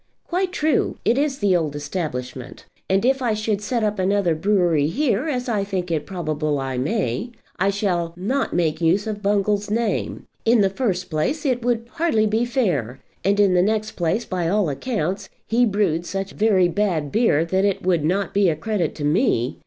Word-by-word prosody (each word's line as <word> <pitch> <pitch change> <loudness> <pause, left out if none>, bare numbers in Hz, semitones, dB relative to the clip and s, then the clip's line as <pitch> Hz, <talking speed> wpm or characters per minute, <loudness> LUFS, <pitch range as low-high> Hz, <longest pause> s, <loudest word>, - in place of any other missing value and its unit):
"Quite 365 +1 -1
true; 310 -5 0
it 235 - +3
is 280 0 0
the 200 -5 +2
old 155 -4 -1
establishment; 145 -5 -5 0.2
and 195 +3 +2
if 265 +1 +2
I 235 -4 +1
should 215 -1 -1
set 230 +2 -1
up 210 -1 -1
another 190 -2 +2
brewery 175 -4 +2
here, 260 - 0
as 250 -3 -2
I 215 -4 0
think 185 -3 -3
it 155 -3 -1
probable 155 -5 -2
I 135 -1 -3
may, 155 - -1 0.3
I 195 +2 +3
shall 185 -4 -1
not 255 +10 -1
make 160 -2 0
use 175 +5 +2
of 210 -2 -4
Bungall's 205 0 +1
name. 225 0 -1 0.2
In 230 -1 +4
the 195 -1 +2
first 190 -6 -2
place 160 - -1
it 250 -3 +1
would 235 -1 0
hardly 245 -6 +1
be 220 +3 +1
fair; 170 - -1 0.2
and 200 +1 +2
in 200 -3 +4
the 180 - +4
next 215 +2 0
place, 175 +7 -1
by 175 -3 -2
all 200 -3 +2
accounts, 195 - -3 0.2
he 240 +2 +3
brewed 185 -5 0
such 195 0 -3
very 205 -4 +3
bad 175 -6 -1
beer 210 -9 +3
that 190 +3 0
it 200 -2 0
would 175 -5 +2
not 190 +5 0
be 200 -2 +4
a 160 - 0
credit 200 +3 -2
to 150 - -6
me. 145 - +1
195 Hz, 190 wpm, -22 LUFS, 165-220 Hz, 0.3 s, In